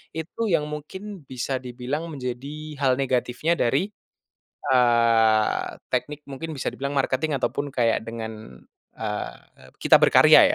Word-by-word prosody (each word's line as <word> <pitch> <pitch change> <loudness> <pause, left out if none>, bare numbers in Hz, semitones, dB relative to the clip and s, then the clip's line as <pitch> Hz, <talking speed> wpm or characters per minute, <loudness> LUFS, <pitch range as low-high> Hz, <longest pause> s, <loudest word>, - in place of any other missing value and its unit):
itu 170 +8 -3
yang 160 -4 +2
mungkin 190 +4 -7
bisa 130 +1 -3
dibilang 130 +6 -4
menjadi 145 +2 -6
hal 130 -2 +3
negatifnya 130 +4 +1
dari, 140 - +1 0.8
eee, 115 -3 +4 0.3
teknik, 150 0 -2
mungkin 140 +4 -6
bisa - - -5
dibilang 140 +1 -4
marketing, 140 +2 +1
ataupun 140 +2 -2
kayak 115 -3 +2
dengan, 110 - -7 0.4
eee, 65 0 -6
kita - - +7
berkarya - - +7
135 Hz, 120 wpm, -24 LUFS, 120-150 Hz, 0.8 s, kita